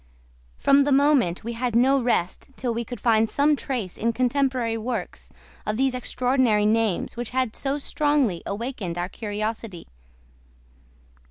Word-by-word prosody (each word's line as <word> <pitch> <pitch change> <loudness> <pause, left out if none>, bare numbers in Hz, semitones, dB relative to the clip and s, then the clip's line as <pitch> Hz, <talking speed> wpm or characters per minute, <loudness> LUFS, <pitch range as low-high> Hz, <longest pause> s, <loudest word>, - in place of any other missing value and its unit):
From 280 0 +4
that 285 - 0
moment 275 - +3
we 235 +2 -4
had 240 0 -2
no 265 +3 +4
rest 235 -5 -1
till 245 -3 -2
we 235 +1 -2
could 245 +2 -8
find 225 -2 +3
some 295 +1 +3
trace 245 -10 -4
in 230 +1 +1
contemporary 255 -2 0
works 225 -3 -4 0.3
of 210 0 -2
these 265 0 +2
extraordinary 250 -3 +1
names 220 -3 +1
which 240 -1 -4
had 255 -3 -1
so 275 +1 -1
strongly 290 - 0
awakened 205 -5 -4
our 175 +1 -2
curiosity. 215 -3 -5
235 Hz, 145 wpm, -24 LUFS, 215-265 Hz, 0.3 s, From